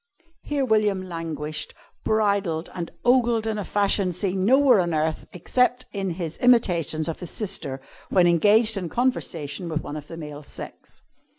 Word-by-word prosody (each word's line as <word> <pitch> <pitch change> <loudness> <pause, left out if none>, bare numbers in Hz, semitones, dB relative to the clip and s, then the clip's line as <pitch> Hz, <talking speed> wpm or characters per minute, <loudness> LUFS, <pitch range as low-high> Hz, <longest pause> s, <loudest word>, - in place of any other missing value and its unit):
here 285 -2 -1
William 210 -5 +1
languished, 160 -3 -4 0.3
bridled 200 -6 0
and 170 -2 -5 0.2
ogled 240 -3 +3
in 220 -1 -2
a - - -2
fashion 200 -1 +1
seen 185 +1 -2
nowhere 260 +1 +5
on 170 -3 0
earth 155 +1 -1
except 250 +7 0
in 195 -2 -3
his 165 -3 -5
imitations 175 - +2
of 165 - -4
his 175 - -7
sister 190 -10 -3 0.3
when 180 -2 +4
engaged 210 +6 +4
in 180 -3 -3
conversation 175 - -2
with 155 -1 -2
one 145 - -6
of 150 -1 -7
the 165 - -9
male 150 -2 -8
sex. 145 - -10
185 Hz, 160 wpm, -24 LUFS, 165-220 Hz, 0.3 s, nowhere